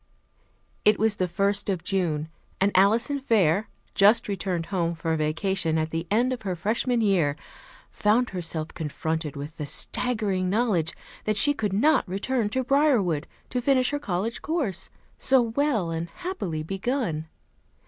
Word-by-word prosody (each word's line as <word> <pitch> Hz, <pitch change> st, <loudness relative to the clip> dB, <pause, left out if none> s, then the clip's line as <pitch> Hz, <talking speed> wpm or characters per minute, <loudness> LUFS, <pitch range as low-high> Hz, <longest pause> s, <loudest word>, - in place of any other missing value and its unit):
It 210 Hz, -, +5 dB
was 220 Hz, 0 st, +2 dB
the 185 Hz, -, 0 dB
first 200 Hz, +3 st, 0 dB
of 180 Hz, -4 st, -1 dB
June, 175 Hz, -5 st, 0 dB, 0.3 s
and 195 Hz, +1 st, +3 dB
Alison 230 Hz, +9 st, +3 dB
Fair, 210 Hz, -, +2 dB, 0.2 s
just 210 Hz, +3 st, +4 dB
returned 185 Hz, -4 st, -2 dB
home 170 Hz, -2 st, 0 dB
for 160 Hz, 0 st, -1 dB
vacation 160 Hz, +2 st, 0 dB
at 160 Hz, 0 st, -1 dB
the 165 Hz, +1 st, -3 dB
end 240 Hz, +5 st, +2 dB
of 250 Hz, -, -6 dB
her 190 Hz, -3 st, -3 dB
Freshman 230 Hz, +6 st, 0 dB
year, 180 Hz, -9 st, +2 dB, 0.6 s
found 225 Hz, +4 st, +2 dB
herself 165 Hz, -3 st, -1 dB
confronted 160 Hz, 0 st, -3 dB
with 145 Hz, +3 st, -7 dB
the 150 Hz, -, -4 dB
staggering 205 Hz, -, +1 dB
knowledge 195 Hz, -7 st, +1 dB, 0.3 s
that 215 Hz, -1 st, 0 dB
she 290 Hz, +8 st, +5 dB
could 220 Hz, -6 st, -2 dB
not 235 Hz, 0 st, +3 dB
return 210 Hz, +4 st, -1 dB
to 260 Hz, +4 st, -1 dB
Briarwood 245 Hz, -, +2 dB, 0.2 s
to 250 Hz, -, -1 dB
finish 255 Hz, 0 st, +2 dB
her 290 Hz, -, -1 dB
college 210 Hz, -2 st, -3 dB
course, 260 Hz, -, -2 dB, 0.3 s
so 265 Hz, 0 st, +4 dB
well 230 Hz, -, 0 dB
and 165 Hz, +1 st, -3 dB
happily 195 Hz, -, -4 dB
begun. 195 Hz, -, -2 dB
195 Hz, 150 wpm, -26 LUFS, 165-235 Hz, 0.6 s, It